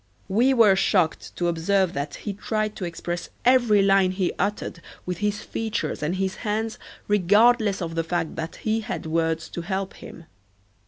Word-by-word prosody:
We 235 +7 +3
were 225 -7 +6
shocked 185 -4 +1
to 175 - 0
observe 175 +2 +1
that 140 +1 -4
he 205 - -5
tried 215 +1 -2
to 185 - -3
express 175 0 -5 0.2
every 240 -5 +5
line 195 -1 +4
he 185 -1 -1
uttered 200 -3 -2 0.2
with 180 -1 -4
his 210 0 -1
features 225 0 -3
and 155 +4 -1
his 190 +1 -2
hands 220 +1 -2 0.3
regardless 210 +1 +4
of 165 -1 -4
the 165 0 0
fact 165 -1 -2
that 165 0 -5
he 220 0 -1
had 215 - -5
words 160 0 0
to 170 - -5
help 190 +2 -3
him. 165 - -12
195 Hz, 170 wpm, -24 LUFS, 170-215 Hz, 0.3 s, were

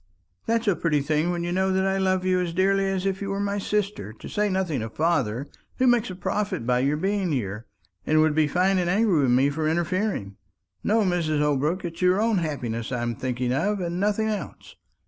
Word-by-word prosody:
"That's 230 0 0
a 200 - +4
pretty 150 -3 +1
thing, 155 +4 0
when 175 -1 -1
you 175 - -2
know 190 +1 +1
that 190 0 +1
I 195 0 +1
love 185 -1 +1
you 185 -1 +2
as 170 -2 -3
dearly 195 +1 +2
as 190 -1 -2
if 195 0 -1
you 200 - -3
were 195 0 -2
my 200 0 -1
sister; 200 - -2
to 110 - -11
say 210 0 0
nothing 185 - -1
of 110 0 -6
father, 135 -6 0 0.3
who 260 - +2
makes 240 -3 +3
a 185 - -6
profit 190 - -2
by 125 0 +2
your 140 +3 +1
being 195 +1 0
here, 110 -4 -3 0.4
and 155 +8 +2
would 155 -1 +4
be 155 0 +3
fine 185 +5 +2
and 175 -1 0
angry 195 -4 +3
with 135 - +2
me 135 +3 +3
for 155 +1 -1
interfering. 170 - -1 0.5
No, 220 +2 +2
Mrs. 170 -5 0
Holbrook; 150 +5 0
it's 165 0 -6
your 180 +2 +3
own 220 -2 +2
happiness 120 -8 -3
I'm 120 -1 -1
thinking 125 0 -2
of, 200 +9 0
and 175 0 -3
nothing 210 +2 +1
else. 205 -9 -6
175 Hz, 220 wpm, -25 LUFS, 145-195 Hz, 0.5 s, a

